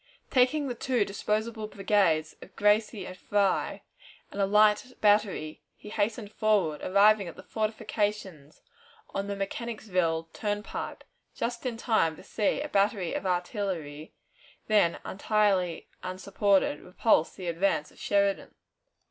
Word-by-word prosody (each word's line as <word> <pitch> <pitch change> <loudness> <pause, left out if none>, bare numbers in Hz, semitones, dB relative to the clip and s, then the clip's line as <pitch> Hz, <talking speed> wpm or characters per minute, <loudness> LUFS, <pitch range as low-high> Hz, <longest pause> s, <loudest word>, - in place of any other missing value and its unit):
Taking 280 +3 +3
the 250 - -2
two 240 -2 0
disposable 215 +2 -2
brigades 190 -7 +1
of - - -14
Gracie 210 -1 +2
and 185 - -8
Fry 200 +1 0 0.5
and 200 - -3
a 195 - +3
light 210 +4 +4
battery, 205 -7 +2
he 210 - -12
hastened 215 0 -1
forward, 200 -10 +1
arriving 200 +1 +4
at 170 - -8
the 185 - -12
fortifications 210 -8 -3 0.5
on 195 0 -2
the 200 - -3
Mechanicsville 195 -5 -2
Turnpike; 205 0 -4 0.3
just 235 +2 -3
in 235 -2 -3
time 220 -9 +1
to - - -14
see 210 +6 0
a 300 - -3
battery 200 -4 +1
of 195 - -2
artillery, 175 -5 -3 0.5
then 205 -6 +3
entirely 195 -4 +1
unsupported, 190 -2 +1
repulse 180 -2 +1
the 185 - -8
advance 170 -2 0
of - - -20
Sheridan. 200 -1 0
200 Hz, 130 wpm, -28 LUFS, 185-215 Hz, 0.5 s, light